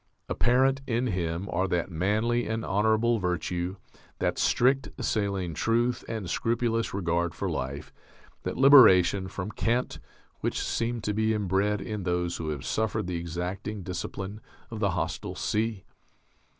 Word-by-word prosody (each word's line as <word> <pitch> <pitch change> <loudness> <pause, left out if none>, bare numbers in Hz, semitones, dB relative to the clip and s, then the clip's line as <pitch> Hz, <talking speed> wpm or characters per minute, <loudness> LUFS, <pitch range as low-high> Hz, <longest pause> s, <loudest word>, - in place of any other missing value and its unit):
Apparent 130 +2 +2
in 120 +1 0
him 90 -3 -2
are 95 +3 +1
that 90 0 -1
manly 110 +8 +1
and 110 0 -2
honourable 110 +3 +2
virtue, 90 0 -2 0.4
that - - -1
strict 135 +2 +3
saline 100 -5 -1
truth 120 +8 +1
and 110 -5 -4
scrupulous 115 +3 0
regard 85 -3 -1
for - - -3
life, 70 +3 -4 0.5
that - - -4
liberation 100 -9 +7
from 100 +1 -5
cant, 120 +3 -1 0.4
which - - -1
seem 115 0 -1
to 105 - -1
be 110 +1 +1
inbred 100 +1 0
in 105 -1 -4
those 90 -1 -1
who 80 - -4
have 75 -4 -4
suffered 110 -5 -1
the 90 -1 -2
exacting 90 +5 -4
discipline 95 +3 -5 0.3
of 110 - -5
the 100 -2 +2
hostile 85 -1 -3
sea. 110 -2 -1
100 Hz, 140 wpm, -28 LUFS, 90-115 Hz, 0.5 s, liberation